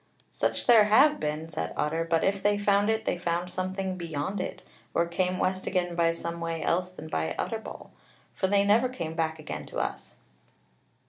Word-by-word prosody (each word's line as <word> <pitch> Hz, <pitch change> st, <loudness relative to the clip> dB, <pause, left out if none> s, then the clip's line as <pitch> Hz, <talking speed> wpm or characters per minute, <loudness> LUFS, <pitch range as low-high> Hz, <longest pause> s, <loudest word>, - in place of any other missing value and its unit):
"Such -, -, -1 dB
there 230 Hz, -4 st, +7 dB
have 275 Hz, +8 st, +5 dB
been," 155 Hz, +2 st, -3 dB
said 155 Hz, -, -3 dB
Otter; 160 Hz, +2 st, 0 dB
"but 165 Hz, -1 st, +2 dB
if 195 Hz, 0 st, +1 dB
they 205 Hz, 0 st, +3 dB
found 205 Hz, 0 st, +3 dB
it, 220 Hz, 0 st, 0 dB
they 175 Hz, -, -1 dB
found 175 Hz, +1 st, -1 dB
something 185 Hz, +1 st, -3 dB
beyond 170 Hz, +3 st, -3 dB
it, -, -, -5 dB, 0.3 s
or 170 Hz, -, +3 dB
came 180 Hz, +2 st, -1 dB
west 185 Hz, +1 st, -1 dB
again 180 Hz, -2 st, 0 dB
by 170 Hz, -1 st, +3 dB
some 170 Hz, 0 st, -5 dB
way 165 Hz, -1 st, -3 dB
else 180 Hz, +1 st, +1 dB
than 180 Hz, -3 st, -10 dB
by 80 Hz, -, -2 dB
Utterbol; 220 Hz, -1 st, -5 dB, 0.4 s
for 190 Hz, -, 0 dB
they 200 Hz, +1 st, +3 dB
never 220 Hz, +5 st, +4 dB
came 170 Hz, -10 st, -5 dB
back 160 Hz, -1 st, -1 dB
again 155 Hz, -1 st, -6 dB
to -, -, -7 dB
us." -, -, -4 dB
180 Hz, 190 wpm, -28 LUFS, 165-200 Hz, 0.4 s, there